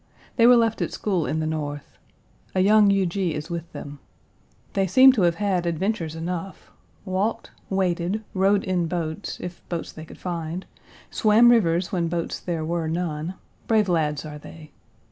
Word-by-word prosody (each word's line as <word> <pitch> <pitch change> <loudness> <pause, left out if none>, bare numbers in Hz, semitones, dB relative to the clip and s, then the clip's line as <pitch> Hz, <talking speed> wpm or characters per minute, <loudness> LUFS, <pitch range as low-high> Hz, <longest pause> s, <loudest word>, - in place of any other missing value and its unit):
They 230 - +5
Page - - +8
187 - - +5
were 230 - +4
left 225 -1 -3
at - - -3
school 185 -7 0
in 160 - -1
the - - -1
North. 145 -2 -5 0.6
A 185 - +3
young 210 +1 +5
Huger 195 -1 +1
is 165 -3 -2
with 170 -1 -5
them. 145 0 -8 0.7
They 195 -1 +1
seem 260 +9 +8
to 245 -6 0
have 170 -2 +3
had 190 -3 0
adventures 170 -1 -2
enough. 175 +3 -6 0.3
Walked, 200 +4 -2 0.2
waded, 190 +2 0
rowed 195 +1 +2
in 180 -3 0
boats, 165 +1 -4
if 180 -1 -7
boats 170 -2 -4
they 155 - -10
could - - -13
find; 170 0 -4 0.5
swam 230 +2 +5
rivers 175 -6 +2
when 175 -3 0
boats 170 0 -3
there 165 -3 -3
were 170 0 -2
none; 165 +1 -3 0.3
brave 215 -3 +3
lads 155 -4 0
are 150 -1 -8
they. 155 0 -12
175 Hz, 175 wpm, -24 LUFS, 160-195 Hz, 0.7 s, Page